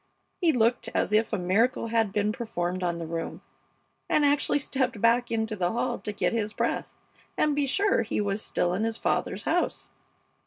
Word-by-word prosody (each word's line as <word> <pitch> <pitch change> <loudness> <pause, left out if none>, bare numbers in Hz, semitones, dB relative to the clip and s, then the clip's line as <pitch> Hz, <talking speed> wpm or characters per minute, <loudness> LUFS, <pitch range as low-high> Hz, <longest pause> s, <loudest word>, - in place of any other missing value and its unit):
He 340 -4 +4
looked 240 -2 +2
as - - +1
if 220 +1 +3
a 215 - 0
miracle 220 +6 +1
had 225 -3 +1
been 210 +1 +1
performed 185 -6 -3
on 175 -1 -1
the 170 - -5
room, 165 0 -5 0.7
and 295 - +3
actually 285 0 +2
stepped 260 -5 -1
back 235 +3 +3
into 220 -1 -1
the 180 -3 0
hall 240 +1 -1
to 210 - -4
get 205 - 0
his 215 -2 -1
breath - - -2 0.4
and 300 -1 +2
be 285 -1 +1
sure 400 +9 +2
he 215 - -2
was 205 0 -1
still 175 -4 0
in 195 +4 -1
his 225 0 -1
father's - - -1
house. - - -1
225 Hz, 190 wpm, -27 LUFS, 200-250 Hz, 0.7 s, He